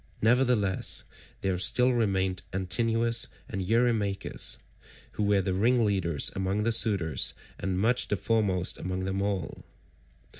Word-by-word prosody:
Nevertheless 115 -4 +1 0.4
there 95 -2 -1
still 125 +6 +4
remained 95 -5 0
Antinous 115 +5 +1 0.2
and 95 -3 -5
Eurymachus, 110 -1 0 0.5
who - - -5
were 100 -1 +2
the 95 - -1
ringleaders 100 - +2
among 95 +2 -1
the 115 - +1
suitors 100 -8 +1 0.2
and 95 0 -2
much 115 +6 +2
the 105 - -1
foremost 95 -4 0
among 95 +1 -4
them 95 +1 -2
all. 100 -3 -3
100 Hz, 120 wpm, -27 LUFS, 95-115 Hz, 0.5 s, still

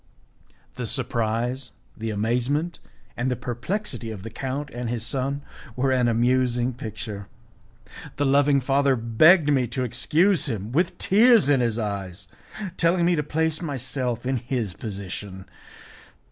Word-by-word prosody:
The 125 -2 -3
surprise, 120 +1 -1 0.2
the 115 0 -4
amazement, 125 +10 -1 0.4
and 125 +2 -1
the 125 - 0
perplexity 125 - -4
of 105 -4 -7
the 115 - -7
count 135 +4 -4
and 120 -1 -4
his 115 -1 -2
son 140 +3 -1 0.3
were 130 +1 +1
an 125 -2 +3
amusing 125 +1 +2
picture. 110 -4 -7 0.9
The 145 - 0
loving 140 0 +4
father 135 +1 +2
begged 150 +8 +5
me 130 -3 +2
to 125 +3 -2
excuse 165 - +2
him, 110 -3 -4
with 165 +8 +1
tears 220 - +5
in 140 -2 +4
his 120 -2 0
eyes, 100 -4 -4 0.5
telling 170 +1 +3
me 175 0 +3
to 150 - +1
place 160 +2 -1
myself 130 -5 -2
in 130 0 0
his 120 -5 -3
position. 95 -1 -7
125 Hz, 140 wpm, -24 LUFS, 115-145 Hz, 0.9 s, begged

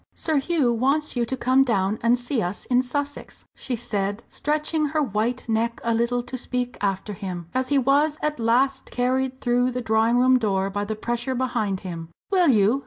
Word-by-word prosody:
"Sir 315 -2 0
Hugh 275 -4 +2
wants 275 +6 +1
you 240 -1 0
to 260 - -3
come 260 +2 +4
down 205 -4 0
and 235 +2 +3
see 245 0 -1
us 180 +2 -4
in 250 0 +3
Sussex," 285 +3 -5
she 255 - -4
said, 205 -2 -3
stretching 305 +1 -1
her 305 +1 0
white 235 +1 -1
neck 230 +1 0
a 230 - +1
little 235 +1 0
to 250 +1 -6
speak 245 0 -3
after 200 +1 -1
him, 180 -3 -6
as 255 0 -1
he 285 - +3
was 285 +3 +3
at 300 -3 -1
last 260 +4 +1
carried 260 +1 0
through 245 0 +2
the 250 0 -3
drawing 225 +1 +2
room 255 +1 +5
door 195 -3 0
by 205 +1 -2
the 220 +1 -3
pressure 240 +4 -2
behind 215 -7 -1
him. 170 -3 -6 0.2
"Will 365 -3 +4
you?" 225 0 +4
245 Hz, 195 wpm, -24 LUFS, 220-265 Hz, 0.2 s, room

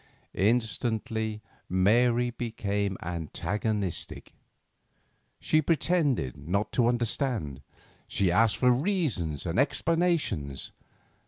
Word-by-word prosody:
Instantly 110 0 0 0.3
Mary 120 +6 +3
became 100 -5 -2
antagonistic. 95 +4 -3 1.1
She 155 - +2
pretended 150 - +1
not 90 +9 -2
to 120 -2 +2
understand; 120 - -1 0.5
she 95 -3 +1
asked 110 +4 +3
for 125 -1 +4
reasons 125 - 0
and 85 +5 0
explanations. 155 - 0
110 Hz, 80 wpm, -28 LUFS, 95-125 Hz, 1.1 s, for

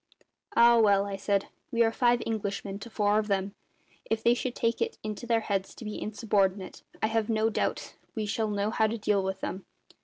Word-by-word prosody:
"Ah, 235 0 +7
well," 200 -2 +4
I 200 -1 -4
said, 200 0 0 0.2
"we 235 0 +3
are 225 - +2
five 240 0 +2
Englishmen 200 -2 -3
to 230 +3 -9
four 210 -1 +2
of 215 - -2
them. 195 -1 -1 0.6
If 220 0 0
they 235 - +5
should 245 0 -3
take 230 0 0
it 460 0 -1
into 215 +2 -5
their 230 -1 +2
heads 195 -3 -2
to 230 - -10
be 210 - -5
insubordinate 200 -3 0 0.2
I - - +6
have 225 0 0
no 220 0 +2
doubt - - -2 0.2
we 220 -2 -1
shall 220 +1 -1
know 205 +1 -1
how 220 - +2
to 225 +2 -3
deal 205 -2 +1
with 190 0 -3
them. 190 - -4
215 Hz, 210 wpm, -28 LUFS, 200-225 Hz, 0.6 s, Ah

